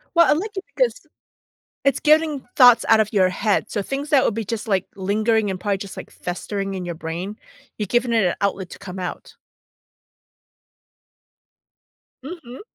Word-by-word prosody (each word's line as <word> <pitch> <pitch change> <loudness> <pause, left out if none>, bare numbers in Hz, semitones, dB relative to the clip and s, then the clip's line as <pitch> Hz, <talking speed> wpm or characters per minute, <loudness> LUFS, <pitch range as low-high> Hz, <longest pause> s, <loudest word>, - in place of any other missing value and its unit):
Well, 340 0 +6
I - - +6
like 405 +8 -4
it 385 - -4
because, - - 0 0.8
it's 275 - +2
getting 305 -2 +3
thoughts 245 -3 +7
out 220 - +6
of 215 0 +1
your 190 -3 +4
head. 205 +3 0
So 205 - -2
things 275 +6 -4
that 275 -3 +5
would - - +1
be 225 +1 -3
just, 220 +2 -4
like, 195 -4 0
lingering 210 +2 +1
and 185 - -5
probably 200 +1 -1
just, 195 0 -8
like, - - -8
festering 195 +2 -4
in 185 -1 -4
your 175 -1 -5
brain, 175 +6 -5 0.4
you're 210 - -2
giving 240 +4 +1
it 225 -4 +3
an 180 - +2
outlet 195 -2 -1
to - - -10
come 185 -1 -8
out. 180 -1 -6 2.9
Mhm. 275 -5 -9
215 Hz, 175 wpm, -22 LUFS, 190-265 Hz, 2.9 s, thoughts